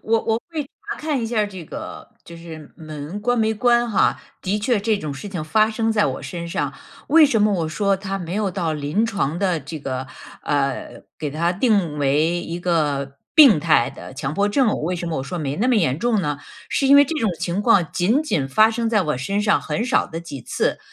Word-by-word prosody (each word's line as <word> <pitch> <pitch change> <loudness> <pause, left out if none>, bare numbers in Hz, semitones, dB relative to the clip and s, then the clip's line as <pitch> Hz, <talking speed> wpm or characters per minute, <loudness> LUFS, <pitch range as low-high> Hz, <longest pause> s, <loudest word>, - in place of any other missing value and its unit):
我 225 +1 +2
我 225 0 0
会 315 -3 -2
查 410 +9 -9
看 300 -4 -1
一 - - -1
下 230 0 -2
儿 210 - +2
这 190 -4 -9
个 - - -8 0.2
就 170 - -11
是 160 -3 -11
门 155 +3 -7
关 245 +3 +1
没 220 0 +2
关 240 +1 +2
哈， 205 - +2 0.2
的 200 +3 -1
确 220 0 +1
这 215 +1 +1
种 155 -7 -5
事 170 +9 -7
情 180 -6 -5
发 215 +7 +3
生 225 0 0
在 210 -2 +2
我 - - -4
身 170 -2 -6
上。 145 -4 -2 0.4
为 315 +2 +7
什 240 -6 +2
么 210 0 +3
我 170 -5 -1
说 195 +5 +1
它 195 0 -4
没 175 0 -5
有 210 -2 0
到 175 -4 -2
临 150 +8 0
床 170 -8 -2
的 180 -5 0
这 155 +4 -7
个， 130 -2 -4 0.4
呃， 140 -2 -2 0.2
给 150 - -3
它 170 +4 0
定 190 - +1
为 150 +5 +1
一 170 0 -5
个 145 -6 -1 0.2
病 270 - +8
态 150 -7 +3
的 - - -11
强 140 +1 -4
迫 205 +2 +1
症， 230 0 +1
为 180 +3 -1
什 175 - -5
么 160 - -2
我 130 - -3
说 175 +6 -5
没 145 -2 -3
那 240 +5 +1
么 250 - +3
严 150 -10 +2
重 230 0 +1
呢？ 145 -4 -2 0.3
是 275 - 0
因 280 - +8
为 285 - +8
这 310 +4 -4
种 220 - +1
情 180 +3 -2
况 200 -8 +4
仅 220 - +2
仅 145 - -1
发 215 +10 +5
生 230 0 -1
在 210 -3 +3
我 150 -5 -1
身 195 +11 -2
上 210 0 +3
很 225 - -2
少 250 - +2
的 165 -1 -6
几 145 -5 -8
次。 - - -1
185 Hz, 250 characters per minute, -21 LUFS, 155-220 Hz, 0.4 s, 病